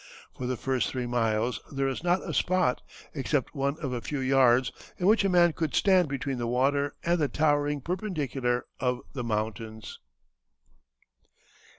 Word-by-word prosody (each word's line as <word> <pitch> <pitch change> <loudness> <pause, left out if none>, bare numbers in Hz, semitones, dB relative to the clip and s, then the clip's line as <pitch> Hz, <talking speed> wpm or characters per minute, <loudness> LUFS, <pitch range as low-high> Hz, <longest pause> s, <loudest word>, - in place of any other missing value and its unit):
For 125 - -4
the 130 -1 -2
first 130 -1 0
three 125 -2 -3
miles 115 -1 0
there 135 -1 0
is 135 +4 -3
not 180 +1 +1
a - - -3
spot, 185 -9 +1 0.3
except 140 -2 -1
one 140 0 -1
of 135 -3 -2
a 120 - -3
few 145 - -4
yards, 130 -2 +4 0.3
in 180 - -2
which 215 +2 +5
a 195 - +2
man 175 -2 +5
could 155 -3 -2
stand 185 -4 +4
between 135 -1 -3
the 120 - -2
water 140 +4 +1
and 175 0 +2
the 150 - +2
towering 145 -1 +1
perpendicular 140 - -2
of 125 -1 0
the 125 - -4
mountains." 110 0 -4
135 Hz, 165 wpm, -28 LUFS, 125-155 Hz, 0.3 s, which